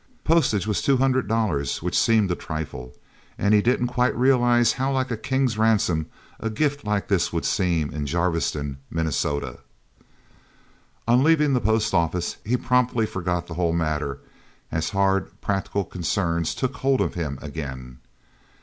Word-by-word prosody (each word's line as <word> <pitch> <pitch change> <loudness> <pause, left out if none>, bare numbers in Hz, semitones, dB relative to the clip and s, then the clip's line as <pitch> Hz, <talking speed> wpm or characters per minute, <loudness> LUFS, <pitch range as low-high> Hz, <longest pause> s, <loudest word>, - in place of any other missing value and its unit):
Postage 135 - +2
was 105 -5 0
two 135 -1 +3
hundred 130 -1 +1
dollars, 105 - -1
which - - -2
seemed 110 -5 +3
a - - +1
trifle. 70 -7 -6 0.4
And 100 +2 +2
he 105 - +5
didn't 125 +2 +1
quite 125 0 0
realize 120 -2 +4
how 135 +1 -1
like 130 -1 -1
a - - 0
king's 130 -1 -1
ransom 100 -8 +2 0.3
a 115 - -2
gift 145 +5 -1
like 105 -1 -1
this 95 -4 +1
would 85 - -2
seem 85 -6 0
in 75 -1 -4
Jarviston, 80 -4 -1
Minnesota. 70 -5 -2 1.5
On 120 +3 +4
leaving 150 -2 +4
the 125 - +2
post 110 +1 +1
office, 85 0 0
he 125 +4 +1
promptly 125 -2 +1
forgot 90 -3 -2
the 85 - -8
whole 85 0 0
matter, 75 -4 -1 0.5
as 80 0 -1
hard, 95 -1 0
practical 100 0 -1
concerns 85 -2 -1
took 130 0 -2
hold 135 0 +1
of - - 0
him, 75 -6 -3
again. 65 -5 -7
100 Hz, 155 wpm, -24 LUFS, 80-125 Hz, 1.5 s, he